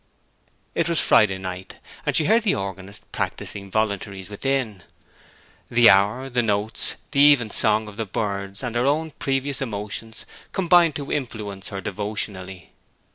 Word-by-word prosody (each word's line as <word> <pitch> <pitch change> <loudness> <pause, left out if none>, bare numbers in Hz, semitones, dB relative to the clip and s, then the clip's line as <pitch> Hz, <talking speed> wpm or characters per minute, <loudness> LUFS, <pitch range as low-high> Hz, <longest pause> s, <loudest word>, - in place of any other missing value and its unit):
It - - 0
was - - +3
Friday 95 -3 +4
night, 95 0 -7 0.3
and - - +1
she 155 - +4
heard 225 +6 +4
the 215 - +1
organist 95 0 -7
practising 100 -1 -4
voluntaries 100 -2 -2
within. 115 -3 -2 0.9
The 120 0 +7
hour, 105 +7 +2
the 125 -2 +1
notes, 105 -1 -1 0.2
the 140 - 0
even 140 -6 +6
song 110 0 +3
of 105 0 -11
the 115 -2 -3
birds, 100 +1 -3
and 120 -2 -4
her 120 +3 +2
own 155 +3 0
previous 135 0 -2
emotions, 110 -1 -5 0.3
combined 175 -4 +4
to 145 -1 -5
influence 105 -7 -4
her 95 -1 -5
devotionally. 100 -3 -4
110 Hz, 145 wpm, -23 LUFS, 100-135 Hz, 0.9 s, The